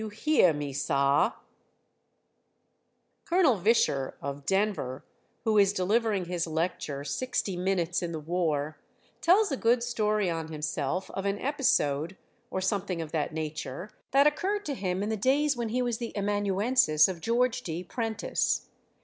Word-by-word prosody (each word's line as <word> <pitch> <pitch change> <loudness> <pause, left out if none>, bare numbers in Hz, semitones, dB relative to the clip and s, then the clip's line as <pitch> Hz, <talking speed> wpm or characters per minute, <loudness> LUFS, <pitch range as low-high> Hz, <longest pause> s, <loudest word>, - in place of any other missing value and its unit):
You 220 - -4
Heah 215 - +3
Me, 145 -2 -4
Sah! 140 +1 +2 1.9
Col. 330 - +3
Visscher, 175 - +2
of 140 0 -6
Denver, 195 -10 0 0.4
who 220 -2 +3
is 200 0 +4
delivering 205 0 +1
his 170 -1 -2
lecture, 160 -3 -2
"Sixty 195 - -2
Minutes 180 -1 0
in 175 -1 -3
the 160 - -4
War," 155 -2 -1 0.4
tells 390 +3 +4
a 275 - -1
good 235 +1 +2
story 215 -4 0
on 165 -2 -2
himself 155 +2 -3
of 195 - -4
an 200 0 0
episode, 190 - 0 0.3
or 190 - -3
something 190 -2 -1
of 160 -2 -5
that 155 -1 -1
nature, 155 +3 -5 0.2
that 275 +2 +4
occurred 390 +8 +1
to 290 - -2
him 190 -5 -2
in 210 - -2
the 220 - -1
days 275 +6 +2
when 235 -2 -3
he 250 +3 0
was 240 -1 -2
the 235 -2 -5
amanuensis 205 -3 +3
of 180 -3 -5
George 245 +4 +1
D. 170 -4 -4
Prentice. 225 +3 -1
195 Hz, 150 wpm, -28 LUFS, 160-235 Hz, 1.9 s, is